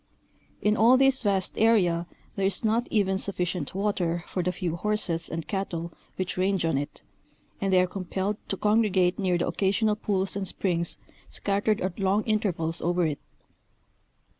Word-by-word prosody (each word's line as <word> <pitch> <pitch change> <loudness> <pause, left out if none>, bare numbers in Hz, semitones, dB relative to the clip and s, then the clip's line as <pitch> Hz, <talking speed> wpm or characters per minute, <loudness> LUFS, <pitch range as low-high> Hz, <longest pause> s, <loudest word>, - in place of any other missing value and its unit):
In 210 0 +3
all 235 +4 +6
this 270 0 +4
vast 195 -4 +1
area 180 -7 +3 0.3
there 195 -1 +1
is 195 +3 0
not 225 +3 +1
even 190 -3 +1
sufficient 180 -5 -2
water 180 -4 0
for 185 - -2
the 180 +1 0
few 180 -3 -3
horses 175 -4 -1
and 165 0 -5
cattle 170 -4 -3 0.2
which 185 -1 -3
range 190 -1 +1
on 165 - +1
it, 145 +1 -4 0.6
and 195 -1 0
they 185 - +5
are 180 - +4
compelled 190 +2 -3
to 195 - -3
congregate 210 -4 +2
near 185 -3 +1
the 170 - 0
occasional 210 +2 +1
pools 195 -3 -1
and 195 -1 -2
springs 170 -2 0 0.3
scattered 205 +1 0
at 185 0 -3
long 195 +2 +2
intervals 175 -7 0
over 175 0 +1
it. 150 -3 -2
190 Hz, 165 wpm, -27 LUFS, 175-210 Hz, 0.6 s, all